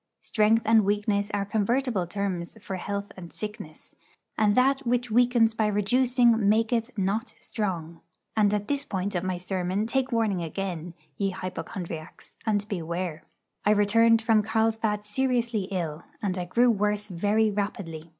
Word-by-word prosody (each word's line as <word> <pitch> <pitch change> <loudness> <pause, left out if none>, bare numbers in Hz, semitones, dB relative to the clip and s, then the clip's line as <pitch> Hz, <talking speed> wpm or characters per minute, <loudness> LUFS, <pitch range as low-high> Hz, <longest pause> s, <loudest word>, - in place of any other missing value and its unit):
Strength 220 +1 +3
and 220 0 +5
weakness 205 0 0
are 200 -1 -1
convertible 220 -1 0
terms 190 0 -3
for 195 -2 -5
health 200 +2 -4
and 175 -3 -10
sickness; 210 -7 -8 0.4
and 210 -1 +3
that 270 +2 +4
which 245 -2 -1
weakens 240 -1 +4
by 220 -1 +1
reducing 230 +1 +3
maketh 225 +2 +2
not 205 +5 -1
strong. 170 -6 -4 0.3
And 210 -2 +4
at 205 -1 -1
this 285 -1 0
point 195 0 -3
of 175 -1 -1
my 185 -1 -1
sermon 185 +2 -2
take 265 +3 0
warning 220 -6 +1
again, 175 0 -4 0.2
ye 195 - 0
hypochondriacs, 180 -3 -7
and 205 -1 +1
beware. 170 -4 -4 0.4
I - - +2
returned 225 +2 +4
from 220 -1 +4
Carlsbad 220 -1 0
seriously 235 -2 0
ill, 170 -5 -3 0.2
and 195 -3 -1
I 180 -1 -3
grew 240 +7 +3
worse 210 -1 0
very 210 +3 +1
rapidly. 180 -6 -4
205 Hz, 150 wpm, -27 LUFS, 185-225 Hz, 0.4 s, and